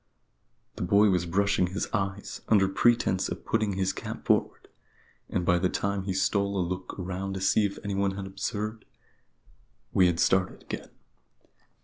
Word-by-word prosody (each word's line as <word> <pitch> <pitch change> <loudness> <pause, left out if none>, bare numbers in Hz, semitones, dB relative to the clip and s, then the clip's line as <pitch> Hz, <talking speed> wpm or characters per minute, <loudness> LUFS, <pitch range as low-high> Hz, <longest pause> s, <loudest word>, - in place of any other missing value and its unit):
The - - -6
boy 100 +3 +4
was 90 -2 +1
brushing 100 +1 +2
his 95 +3 -3
eyes, 100 0 -3
under 100 -3 +5
pretence 95 -1 +2
of - - -6
putting 110 -2 +1
his 95 0 0
cap - - -7
forward; - - +1 0.6
and 90 - -1
by 90 0 +3
the 90 +1 +1
time 100 -1 -2
he 95 - -1
stole 100 +1 +1
a 90 -2 0
look 90 +1 -5
around 95 +1 -4
to - - -3
see 100 +2 +3
if 100 - -9
anyone 100 -1 0
had 100 - -4
observed, 105 +3 -4 1.1
we 90 -2 +5
had 85 -1 0
started 95 +1 +2
again. - - -6
95 Hz, 160 wpm, -28 LUFS, 95-100 Hz, 1.1 s, under